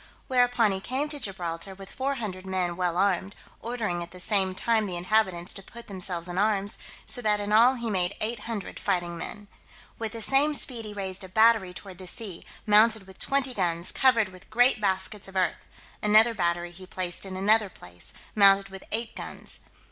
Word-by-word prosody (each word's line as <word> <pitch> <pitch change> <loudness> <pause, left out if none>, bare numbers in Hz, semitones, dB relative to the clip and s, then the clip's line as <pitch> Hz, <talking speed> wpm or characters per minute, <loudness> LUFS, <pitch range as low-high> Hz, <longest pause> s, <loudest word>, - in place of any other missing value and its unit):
Whereupon 245 -4 +3
he 190 - -2
came 265 +9 -3
to 295 -1 -4
Gibraltar 185 -3 -5
with 195 0 -12
four 275 +1 -1
hundred 200 -7 -5
men 185 -2 -2
well 175 -1 -1
armed, 195 0 0 0.3
ordering 220 -7 -3
at 170 - -7
the 180 - -13
same 190 -1 +2
time 220 +1 +1
the 180 -2 -4
inhabitants 185 -2 0
to 195 - -9
put 235 +4 -12
themselves 180 -3 -2
in 175 +1 -3
arms, 205 -1 +1 0.3
so 245 - +3
that 210 -2 +1
in 205 0 -4
all 235 +5 +6
he 235 -2 -5
made 185 -3 0
eight 225 +1 -1
hundred 215 -2 -6
fighting 175 -3 -1
men. 205 +4 -8 0.5
With 225 -1 -4
the 230 - -5
same 290 +4 +5
speed 240 -5 +4
he 210 - -7
raised 195 -1 -4
a 190 - -9
battery 220 -1 +4
toward 185 0 -11
the 185 - -8
sea, 195 -4 -2 0.2
mounted 215 0 +4
with 190 -1 -16
twenty 275 -2 0
guns, 175 -4 0
covered 230 -6 +3
with 185 +1 -16
great 245 0 +3
baskets 195 +1 0
of 195 - -13
earth: 185 -2 -1 0.3
another 215 +3 +5
battery 175 -3 -1
he 185 +1 -13
placed 180 -2 -4
in 190 -1 -6
another 210 +2 +3
place, 90 - -6 0.2
mounted 195 -1 +5
with 195 0 -10
eight 230 +1 -2
guns. - - -3
200 Hz, 195 wpm, -27 LUFS, 185-225 Hz, 0.5 s, all